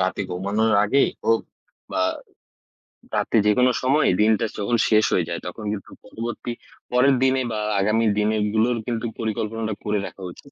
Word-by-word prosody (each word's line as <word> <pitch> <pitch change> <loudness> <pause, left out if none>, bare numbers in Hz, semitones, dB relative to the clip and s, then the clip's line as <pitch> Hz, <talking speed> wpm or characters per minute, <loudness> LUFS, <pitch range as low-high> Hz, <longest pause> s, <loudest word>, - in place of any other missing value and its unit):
রাতে 95 +2 0
ঘুমানোর 100 +5 0
আগেই 135 +7 +3 0.2
হোক 115 0 +3 0.5
বা - - 0 1.2
রাতে - - +1
যেকোনো 125 +5 +4
সময় 135 +4 +3
দিনটা 110 +1 +3
যখন 110 +4 0
শেষ 110 -1 +4
হয়ে 85 -3 +1
যায় 85 - -3
তখন 100 +5 -7
কিন্তু 100 -3 -8
পরবর্তী, 120 +1 -5 0.4
পরের 130 +2 +4
দিনে 130 0 +3
বা 110 - -2 0.2
আগামী 105 +3 +2
দিনে 105 +1 +2 0.2
গুলোর 115 +2 +2
কিন্তু 120 -1 -2
পরিকল্পনাটা 110 0 -2
করে 105 -1 0
রাখা - - -13
উচিত 140 - -16
110 Hz, 155 wpm, -23 LUFS, 105-120 Hz, 1.2 s, যেকোনো